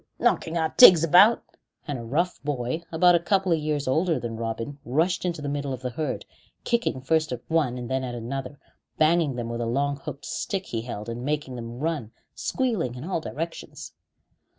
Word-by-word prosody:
knocking 165 Hz, +1 st, +1 dB
our 160 Hz, -1 st, +1 dB
tigs 180 Hz, -10 st, +10 dB
about!" 185 Hz, +8 st, +6 dB, 0.4 s
And 145 Hz, -4 st, -3 dB
a -, -, -7 dB
rough 165 Hz, +10 st, -1 dB
boy 140 Hz, +1 st, -2 dB
about 175 Hz, +2 st, +5 dB
a 170 Hz, -, +5 dB
couple 190 Hz, +1 st, +1 dB
of 165 Hz, -, +3 dB
years 150 Hz, -2 st, -2 dB
older 160 Hz, +3 st, +2 dB
than 120 Hz, -1 st, -5 dB
Robin 115 Hz, +5 st, -4 dB
rushed 165 Hz, +9 st, 0 dB
into 170 Hz, -4 st, -2 dB
the -, -, -3 dB
middle 140 Hz, -1 st, -2 dB
of 130 Hz, 0 st, -7 dB
the 125 Hz, -, -2 dB
herd, 150 Hz, +5 st, -3 dB, 0.4 s
kicking 235 Hz, -, 0 dB
first 155 Hz, +2 st, +1 dB
at 120 Hz, -1 st, -5 dB
one 150 Hz, -7 st, +1 dB
and 120 Hz, -1 st, -5 dB
then 130 Hz, +1 st, -1 dB
at 125 Hz, -1 st, -4 dB
another, 130 Hz, +4 st, -5 dB, 0.4 s
banging 155 Hz, -3 st, +3 dB
them 120 Hz, -1 st, -3 dB
with 115 Hz, 0 st, -4 dB
a 115 Hz, -, -1 dB
long 140 Hz, +4 st, 0 dB
hooked 140 Hz, +1 st, -8 dB
stick 190 Hz, -2 st, -3 dB
he 115 Hz, -, -3 dB
held, 110 Hz, -2 st, -6 dB
and 115 Hz, +1 st, -5 dB
making 145 Hz, -2 st, -2 dB
them 120 Hz, 0 st, -7 dB
run 145 Hz, -6 st, -2 dB, 0.2 s
squealing 220 Hz, -, -1 dB
in 125 Hz, -, -7 dB
all 170 Hz, -1 st, -2 dB
directions. 165 Hz, +2 st, -6 dB
145 Hz, 195 wpm, -25 LUFS, 125-165 Hz, 0.4 s, tigs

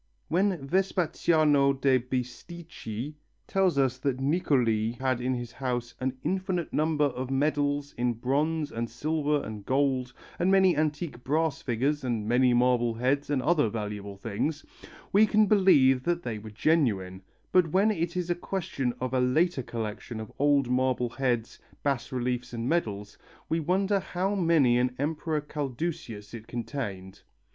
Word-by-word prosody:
When 175 Hz, -4 st, +1 dB
Vespasiano 155 Hz, -5 st, +2 dB
da 135 Hz, -1 st, +3 dB
Bisticci 125 Hz, 0 st, -6 dB, 0.3 s
tells 190 Hz, -5 st, +2 dB
us 130 Hz, -2 st, +1 dB
that 130 Hz, -1 st, -1 dB
Niccoli 125 Hz, -7 st, +1 dB
"had 130 Hz, -2 st, 0 dB
in 130 Hz, +1 st, 0 dB
his 120 Hz, -1 st, -5 dB
house 125 Hz, -2 st, -3 dB
an 130 Hz, 0 st, -2 dB
infinite 185 Hz, -2 st, -2 dB
number 155 Hz, -1 st, +1 dB
of 130 Hz, -2 st, -3 dB
medals 145 Hz, +1 st, 0 dB
in 120 Hz, 0 st, +1 dB
bronze 145 Hz, +6 st, 0 dB
and 115 Hz, 0 st, -3 dB
silver 150 Hz, +3 st, -1 dB
and 105 Hz, -2 st, -7 dB
gold, 130 Hz, 0 st, +1 dB, 0.3 s
and 180 Hz, -, +2 dB
many 190 Hz, -2 st, +5 dB
antique 150 Hz, -3 st, -2 dB
brass 155 Hz, +1 st, 0 dB
figures, 135 Hz, +4 st, -1 dB
and 115 Hz, -4 st, -2 dB
many 125 Hz, +2 st, +4 dB
marble 120 Hz, -1 st, +2 dB
heads, 135 Hz, +5 st, 0 dB
and 140 Hz, -3 st, 0 dB
other 155 Hz, -9 st, +3 dB
valuable 105 Hz, -2 st, -5 dB
things," 120 Hz, +9 st, -3 dB, 0.5 s
we 210 Hz, +2 st, +6 dB
can 215 Hz, 0 st, +4 dB
believe 165 Hz, -11 st, +5 dB
that 170 Hz, +4 st, -1 dB
they 110 Hz, -3 st, -4 dB
were 110 Hz, +1 st, -9 dB
genuine, 105 Hz, -, +1 dB, 0.3 s
but 180 Hz, -2 st, +4 dB
when 200 Hz, +5 st, +4 dB
it 170 Hz, -2 st, -2 dB
is 175 Hz, -1 st, -1 dB
a -, -, +4 dB
question 170 Hz, -9 st, -3 dB
of 130 Hz, 0 st, -3 dB
a 130 Hz, -, +2 dB
later 140 Hz, +5 st, +2 dB
collection 115 Hz, -1 st, -5 dB
of 110 Hz, -, -7 dB
old 140 Hz, -2 st, +3 dB
marble 125 Hz, -1 st, +1 dB
heads, 120 Hz, -2 st, -2 dB, 0.2 s
bas 140 Hz, -4 st, -1 dB
reliefs 125 Hz, -1 st, -2 dB
and 115 Hz, 0 st, -3 dB
medals, 105 Hz, -11 st, -2 dB, 0.3 s
we 165 Hz, -, +1 dB
wonder 190 Hz, +5 st, +1 dB
how 190 Hz, +2 st, -2 dB
many 165 Hz, -10 st, +3 dB
an 125 Hz, 0 st, 0 dB
Emperor 155 Hz, +2 st, -1 dB
Caldusius 135 Hz, -7 st, -5 dB
it 115 Hz, -1 st, -9 dB
contained. 110 Hz, -6 st, -5 dB
135 Hz, 150 wpm, -28 LUFS, 120-160 Hz, 0.5 s, we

